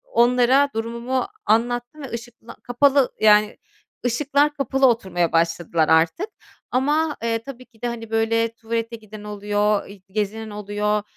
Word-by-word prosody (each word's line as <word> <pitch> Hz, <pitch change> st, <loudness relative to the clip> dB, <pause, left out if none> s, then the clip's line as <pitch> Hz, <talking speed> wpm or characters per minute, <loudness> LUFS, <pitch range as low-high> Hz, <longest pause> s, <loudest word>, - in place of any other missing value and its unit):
onlara 250 Hz, -, +3 dB
durumumu 235 Hz, +5 st, -2 dB, 0.2 s
anlattım 240 Hz, +5 st, 0 dB
ve 270 Hz, -, -7 dB
ışıkla 235 Hz, 0 st, -9 dB
kapalı, 270 Hz, +2 st, +3 dB
yani, 210 Hz, -1 st, +5 dB, 0.5 s
ışıklar 285 Hz, +4 st, +1 dB
kapalı 270 Hz, -1 st, +2 dB
oturmaya 190 Hz, -8 st, +1 dB
başladılar 165 Hz, -1 st, +1 dB
artık. 160 Hz, -, +3 dB, 0.4 s
Ama, 295 Hz, +4 st, +1 dB
eee, 230 Hz, -1 st, 0 dB
tabii 255 Hz, -1 st, -10 dB
ki 230 Hz, -3 st, -28 dB
de, 245 Hz, -, -1 dB
hani, 225 Hz, -2 st, -6 dB
böyle 225 Hz, 0 st, +1 dB
tuvalete 230 Hz, +1 st, -3 dB
giden 215 Hz, -1 st, -12 dB
oluyor, 205 Hz, 0 st, 0 dB
ııı, 200 Hz, 0 st, -12 dB
gezinen 215 Hz, +2 st, -3 dB
oluyor. 210 Hz, 0 st, -1 dB
230 Hz, 135 wpm, -22 LUFS, 210-250 Hz, 0.5 s, yani